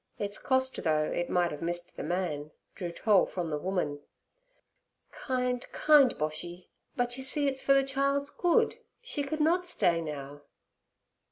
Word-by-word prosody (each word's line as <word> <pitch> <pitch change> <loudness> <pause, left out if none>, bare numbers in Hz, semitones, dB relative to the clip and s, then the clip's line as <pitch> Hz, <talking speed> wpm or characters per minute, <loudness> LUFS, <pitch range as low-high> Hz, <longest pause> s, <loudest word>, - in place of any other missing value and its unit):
Its 205 0 -3
cost, 260 0 0
though 155 -3 +2
it 175 +3 -2
might 175 -1 +1
have 150 - -7
missed 175 +1 -3
the - - -6
man, 155 -3 -2 0.2
drew 175 -4 -5
toll 200 +2 +3
from 175 -3 -4
the 150 - 0
woman. 180 -5 -2 1.1
'Kind, 250 -2 -2
kind 295 -5 +5
Boshy! 175 +4 -5 0.3
But, 245 0 -1
you 265 - -3
see, 285 +2 +2
it's 265 -1 0
for 275 - +4
the 275 - +4
child's 275 +1 0
good. 410 +6 +2 0.2
She 390 -11 -3
could 310 +2 -3
not 350 +4 +2
stay 170 - +2
now.' 145 -2 -7
205 Hz, 160 wpm, -29 LUFS, 170-275 Hz, 1.1 s, kind